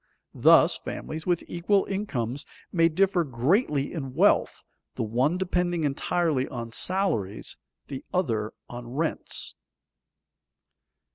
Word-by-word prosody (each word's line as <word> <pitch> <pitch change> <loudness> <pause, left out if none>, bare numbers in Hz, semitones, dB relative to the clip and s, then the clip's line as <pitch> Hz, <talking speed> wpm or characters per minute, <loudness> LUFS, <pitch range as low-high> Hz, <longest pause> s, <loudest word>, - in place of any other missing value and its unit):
Thus, - - +5
families 160 +2 -6
with 175 -2 +1
equal 190 +3 +1
incomes 140 - -3 0.2
may 165 -2 +4
differ 185 +1 +2
greatly 140 - +1
in 135 -6 -5
wealth, - - +3 0.3
the - - -1
one 125 +10 +1
depending 180 -2 0
entirely 150 -1 0
on 115 -2 -6
salaries, 115 - -1 0.3
the 135 -2 -6
other 115 - 0 0.2
on 120 0 -8
rents. 160 +2 -2
155 Hz, 110 wpm, -27 LUFS, 125-180 Hz, 0.3 s, Thus